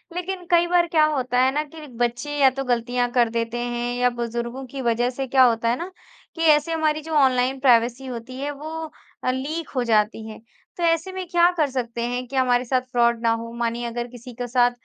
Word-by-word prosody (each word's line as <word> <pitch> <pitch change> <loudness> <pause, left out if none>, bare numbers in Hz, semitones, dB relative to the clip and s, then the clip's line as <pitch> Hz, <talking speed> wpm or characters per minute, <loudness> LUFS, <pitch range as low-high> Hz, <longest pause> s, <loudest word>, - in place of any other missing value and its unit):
लेकिन 360 0 -4
कई 345 0 +5
बार 345 0 +3
क्या 325 -2 +3
होता 255 -5 0
है 260 +1 +4
ना 300 +1 0
कि 310 +1 -11
बच्चे 245 +5 -1
या 275 -2 +6
तो 270 +1 -4
ग़लतियाँ 245 0 0
कर 240 -2 +3
देते 230 +1 -2
हैं 240 0 -2
या 250 0 +3
बुज़ुर्गों 235 +2 -4
की 275 - -5
वजह 240 0 +1
से 265 +1 -4
क्या 260 +1 +5
होता 230 -2 +3
है 240 - +1
ना 350 +5 -6 0.4
कि 330 - -5
ऐसे 305 0 +4
हमारी 310 -1 0
जो 320 +1 -7
ऑनलाइन 260 -2 +3
प्राइवेसी 245 0 +3
होती 255 0 -7
है 285 +1 -2
वो 290 +2 -8 0.5
अ, 255 - +2
लीक 295 +5 -4
हो 250 - +1
जाती 220 -1 +1
है। 215 - -9 0.4
तो 350 - -3
ऐसे 330 +2 +1
में 375 0 -5
क्या 345 0 +4
कर 300 -3 +2
सकते 240 -3 -3
हैं 245 +1 -3
कि 270 - -8
हमारे 250 -1 +2
साथ 255 +1 +1
फ्रॉड 235 -1 +2
ना 230 - +2
हो? 230 0 -3
मानिए 235 0 -2
अगर 240 0 -4
किसी 245 0 -11
के 245 +1 -5
साथ 245 0 +3
250 Hz, 225 wpm, -23 LUFS, 240-295 Hz, 0.5 s, या